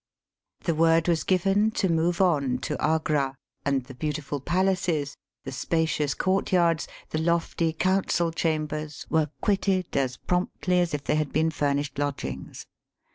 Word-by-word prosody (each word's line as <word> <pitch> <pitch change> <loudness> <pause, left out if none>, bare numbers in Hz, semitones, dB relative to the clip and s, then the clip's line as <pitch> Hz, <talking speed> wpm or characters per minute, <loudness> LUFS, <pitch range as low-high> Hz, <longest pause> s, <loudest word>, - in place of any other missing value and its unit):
The 170 - +1
word 165 +1 +3
was 170 -2 +2
given 195 +3 +2
to 195 - +2
move 170 +1 +1
on 140 -9 +2
to - - -2
Agra, 150 -3 +1 0.3
and 140 -2 +1
the 130 - -11
beautiful 145 +1 -3
palaces, 175 -2 0 0.3
the 135 - -6
spacious 155 +1 0
courtyards, 180 -4 +2 0.2
the 155 - -1
lofty 170 0 +1
council 175 0 +1
chambers, 155 -2 -2
were 160 -2 +2
quitted 195 -3 +1
as 130 -2 0
promptly 180 0 0
as 175 -3 +1
if 145 - -5
they 150 - +1
had 155 -2 -1
been 160 +2 +2
furnished 145 -1 -1
lodgings. 145 -1 -4
160 Hz, 140 wpm, -26 LUFS, 145-175 Hz, 0.3 s, word